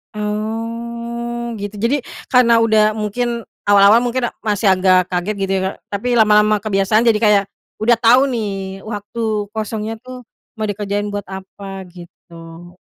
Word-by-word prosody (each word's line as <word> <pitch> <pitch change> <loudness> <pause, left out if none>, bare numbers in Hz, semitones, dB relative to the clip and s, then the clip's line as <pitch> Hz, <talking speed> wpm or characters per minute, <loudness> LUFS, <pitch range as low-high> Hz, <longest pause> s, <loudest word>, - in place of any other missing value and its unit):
Oh, 235 +2 -4
gitu. 205 0 -6
Jadi, 245 +5 0 0.2
karena 240 -2 +4
udah 215 -1 +4
mungkin 230 +2 -3 0.2
awal-awal 205 +3 +5
mungkin 245 0 -1
a - - -7
masih 210 -1 0
agak 185 -1 +4
kaget 180 +4 -2
gitu 195 0 -1
ya, 190 - 0
Kak, - - -13
tapi 200 +4 -4
lama-lama 210 -1 +4
kebiasaan. 215 +2 +1
Jadi, 225 - +5
kayak 210 -2 +5 0.4
udah 235 +2 +4
tau 245 +4 +4
nih 195 -6 -4
waktu 210 +1 -6 0.3
kosongnya 220 0 -3
tuh, 255 -2 -10 0.3
mau 215 - -1
dikerjain 205 0 -2
buat 205 0 -4
apa, 190 0 -8
gitu. 170 0 -13
215 Hz, 145 wpm, -18 LUFS, 195-230 Hz, 0.4 s, awal-awal